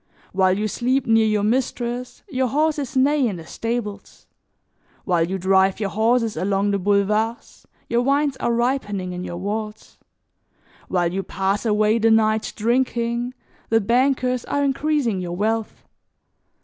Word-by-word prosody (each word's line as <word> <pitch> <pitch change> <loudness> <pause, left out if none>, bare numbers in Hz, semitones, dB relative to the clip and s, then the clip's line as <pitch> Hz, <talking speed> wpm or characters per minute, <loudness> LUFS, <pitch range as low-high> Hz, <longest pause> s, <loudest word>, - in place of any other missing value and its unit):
While 190 0 +3
you 215 +1 0
sleep 255 +5 0
near 225 -1 +4
your 210 -1 +1
mistress, 245 +1 -2
your 260 -7 0
horses 290 0 0
neigh 280 0 +3
in 205 - -3
the 165 -2 -9
stables; 225 +1 -5 0.8
while 175 -4 +2
you 190 - -2
drive 190 +1 +2
your 200 -3 -2
horses 230 +1 +1
along 200 +1 0
the 200 - 0
boulevards, 210 +4 0 0.2
your 235 +1 +1
wines 280 +2 +1
are - - -1
ripening 230 -6 -1
in 180 0 -5
your 175 - -5
vaults; 210 +3 -5 0.9
while 175 -2 0
you 195 - -1
pass 195 +3 -2
away 215 +1 +2
the 225 +1 +3
night 220 0 +2
drinking, 235 +1 0 0.3
the 225 - +4
bankers 250 +2 +1
are 285 - -1
increasing 275 -7 0
your 175 -1 -4
wealth. 220 +3 -2
225 Hz, 145 wpm, -22 LUFS, 200-250 Hz, 0.9 s, near